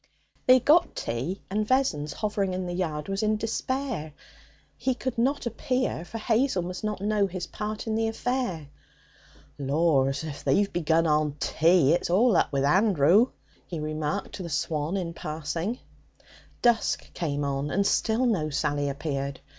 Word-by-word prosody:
They 255 0 +8
got 315 +7 +4
tea; 130 +12 -3
and 210 +1 0
Vessons, 190 - +1
hovering 200 -3 -1
in 185 0 -3
the 175 - -4
yard, 155 -4 -2
was 195 0 -2
in 215 0 +1
despair. 225 - -3 0.6
He 260 -1 -1
could 260 0 -3
not 270 +4 +1
appear, 250 -5 -1
for 225 - -7
Hazel 225 -3 +1
must 180 +3 -6
not 210 -2 -2
know 205 -1 +2
his 185 -2 -5
part 210 +4 -5
in 220 - -2
the 225 0 +1
affair. 225 - -2 0.9
'Laws! 140 -1 +2
If 150 -3 -7
they've 195 +9 +2
begun 165 -1 +2
on 150 -2 +2
tea, 165 -3 +4
it's 175 - 0
all 210 +5 +4
up - - +2
with 135 -1 0
Andrew,' 190 - +4 0.4
he 170 - -5
remarked 155 +5 -3
to - - -6
the 170 - -5
swan 155 +4 -1
in 170 -3 -3
passing. 165 +8 -3 0.9
Dusk 240 -2 +1
came 145 -4 -2
on 140 +1 -1
and 200 +6 +1
still 225 +5 +2
no 180 -11 +1
Sally 145 0 0
appeared. 140 -1 -3
180 Hz, 160 wpm, -27 LUFS, 150-220 Hz, 0.9 s, They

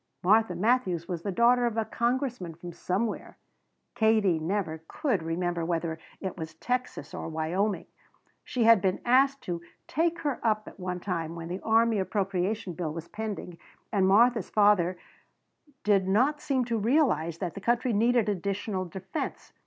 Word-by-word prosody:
Martha 210 0 +4
Matthews 185 -4 +1
was 175 -3 -4
the 200 - -3
daughter 240 +4 +4
of 230 -1 -3
a 225 - +1
congressman 240 - -1
from 175 +1 -9
somewhere 195 +6 -3 0.6
Katie 220 -7 +3
never 160 -1 -2
could 245 - -1
remember 170 +1 -2
whether 165 -1 -2 0.2
it 190 -2 -4
was 160 -1 -6
Texas 250 +8 -3
or - - -5
Wyoming. 175 +6 -1 0.6
She 265 -5 -1
had 225 -3 +7
been 190 -1 +1
asked 270 +3 +4
to 170 -2 -4 0.3
"take 335 +2 0
her 290 -4 -1
up" 215 -2 0
at - - -12
one 180 -1 -4
time 170 -4 -3
when 165 0 -7
the 180 +2 -3
army 225 -1 +3
appropriation 195 0 -1
bill 165 -2 -3
was 165 +1 -7
pending 210 -5 -5 0.3
and 195 -3 +3
Martha's 225 +1 +4
father 200 -4 +3 0.9
did 200 -3 +3
not 255 +10 +2
seem 260 -4 0
to 230 -1 -1
realize 210 - +2
that 175 -2 -3
the 200 - -8
country 240 +2 +1
needed 230 +1 +3
additional 200 0 -2
defense. 190 - -6
200 Hz, 160 wpm, -28 LUFS, 175-235 Hz, 0.9 s, had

